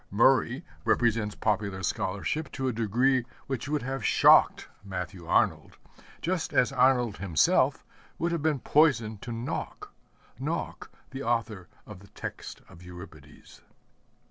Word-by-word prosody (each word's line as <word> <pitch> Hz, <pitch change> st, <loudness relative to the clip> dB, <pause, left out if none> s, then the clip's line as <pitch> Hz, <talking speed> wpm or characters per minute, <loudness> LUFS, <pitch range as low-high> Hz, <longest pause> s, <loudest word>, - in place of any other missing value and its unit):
Murray 130 Hz, -, +3 dB, 0.2 s
represents 110 Hz, -3 st, +1 dB
popular 100 Hz, -3 st, -1 dB
scholarship 100 Hz, +15 st, -2 dB
to 130 Hz, -2 st, -2 dB
a 125 Hz, -, 0 dB
degree 120 Hz, +4 st, +1 dB, 0.2 s
which 135 Hz, 0 st, -4 dB
would 150 Hz, -3 st, -1 dB
have 135 Hz, -1 st, -4 dB
shocked -, -, +5 dB, 0.2 s
Matthew 90 Hz, -3 st, -6 dB
Arnold, -, -, +1 dB, 0.5 s
just 180 Hz, -1 st, -2 dB
as 125 Hz, -, +3 dB
Arnold 125 Hz, -4 st, +2 dB
himself 90 Hz, -6 st, +2 dB, 0.3 s
would 170 Hz, +1 st, -1 dB
have 170 Hz, -2 st, -1 dB
been 155 Hz, -1 st, +1 dB
poison 120 Hz, -9 st, +2 dB
to 120 Hz, -, -9 dB
Nauck 115 Hz, +2 st, -5 dB, 0.5 s
Nauck -, -, -4 dB, 0.2 s
the 135 Hz, 0 st, -6 dB
author 115 Hz, -7 st, -2 dB, 0.2 s
of 105 Hz, -4 st, -11 dB
the 100 Hz, -, -16 dB
text -, -, -8 dB
of 85 Hz, -, -16 dB
Euripides. 90 Hz, -4 st, -13 dB
115 Hz, 130 wpm, -28 LUFS, 100-135 Hz, 0.5 s, shocked